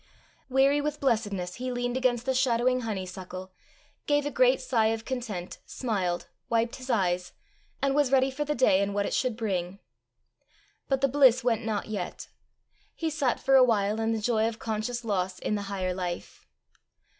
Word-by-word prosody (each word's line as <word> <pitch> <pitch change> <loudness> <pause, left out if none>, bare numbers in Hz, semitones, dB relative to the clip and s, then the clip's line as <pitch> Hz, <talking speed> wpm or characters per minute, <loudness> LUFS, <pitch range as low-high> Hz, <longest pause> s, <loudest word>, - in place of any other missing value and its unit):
Weary 275 +2 +4
with 300 0 -3
blessedness 205 -8 -1
he 255 +1 -3
leaned 245 0 -2
against 250 -2 +1
the 265 - +1
shadowing 255 0 +2
honeysuckle, 185 -4 -6 0.6
gave 290 -1 +2
a 290 - -2
great 255 0 +4
sigh 245 -4 +1
of 225 0 -2
content, 225 -9 -5
smiled, 190 -8 -2 0.2
wiped 230 0 +1
his 260 0 -10
eyes, 180 -5 0 0.5
and 275 -1 +3
was 285 -2 +2
ready 265 0 +4
for 290 +3 -2
the 295 0 -2
day 215 -6 +4
and 200 0 -1
what 200 0 +1
it - - -3
should 250 -4 0
bring. 190 -4 -2 1.1
But 270 -1 +1
the 275 - +4
bliss 260 -2 +5
went 230 -2 +1
not 215 -2 -2
yet; 205 -5 -5 0.7
he 325 -1 -2
sat 285 -5 0
for 270 - +1
a 265 -1 +8
while 215 -3 +2
in 225 0 0
the 225 - 0
joy 220 0 +1
of 225 -1 -4
conscious 230 +2 -3
loss 190 -3 -1
in - - -2
the 205 - -1
higher 185 -2 -2
life. 180 -1 -5
230 Hz, 180 wpm, -28 LUFS, 200-260 Hz, 1.1 s, a